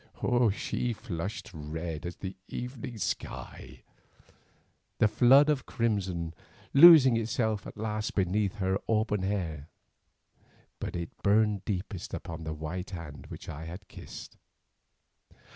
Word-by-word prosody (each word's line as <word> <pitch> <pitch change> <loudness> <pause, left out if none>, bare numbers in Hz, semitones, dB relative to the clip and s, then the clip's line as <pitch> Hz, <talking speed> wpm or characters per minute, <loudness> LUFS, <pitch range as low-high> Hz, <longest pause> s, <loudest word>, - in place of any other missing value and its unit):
She 120 +3 -2
flushed 105 -2 -5
red 80 +1 -5
as 85 - -6
the 95 -1 -6
evening 125 -1 -6
sky, 65 - -5 1.1
the - - +5
flood 125 +7 +6
of 145 -4 0
crimson 95 -8 -1 0.4
losing 140 -5 +9
itself 110 -2 -1
at - - -10
last 110 0 -3
beneath 100 +1 +1
her 95 -1 0
auburn 110 -2 +1
hair, 85 -7 -2 1.1
but - - -4
it 85 -1 -5
burned 105 -1 +3
deepest 95 -2 -4
upon 80 -2 -7
the 80 - -3
white 85 +5 -5
hand 85 -7 -8
which - - -9
I 80 0 -6
had 90 +5 -9
kissed. - - -10
100 Hz, 120 wpm, -29 LUFS, 85-110 Hz, 1.1 s, losing